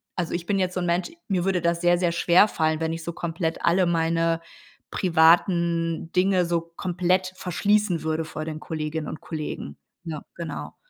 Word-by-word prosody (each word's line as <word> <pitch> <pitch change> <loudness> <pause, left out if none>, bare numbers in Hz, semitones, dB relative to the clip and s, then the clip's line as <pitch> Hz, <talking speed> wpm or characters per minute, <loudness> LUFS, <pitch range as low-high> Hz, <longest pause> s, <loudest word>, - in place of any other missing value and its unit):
also 175 -2 -2
ich 175 0 -3
bin 195 +1 0
jetzt 185 -1 -1
so - - 0
'n 175 - -1
Mensch 175 - 0 0.2
mir 185 -4 0
würde 190 -2 +2
das 170 +1 0
sehr, 175 0 +4
sehr 175 -1 +1
schwerfallen, 170 -3 +3
wenn 160 0 -1
ich 165 0 -6
so 170 - -4
komplett 165 0 -3
alle 180 +2 +4
meine 165 0 +1 0.5
privaten 170 -1 +3
Dinge 185 -1 +3
so 170 -1 0
komplett 180 +2 -1
verschließen 200 0 +1
würde 160 0 -1
vor 155 0 -6
den 155 -1 -5
Kolleginnen 155 -1 -4
und - - -6
Kollegen. 150 - -6 0.3
Ja, 155 -3 -5 0.2
genau. 165 -4 -6
170 Hz, 175 wpm, -25 LUFS, 160-180 Hz, 0.5 s, sehr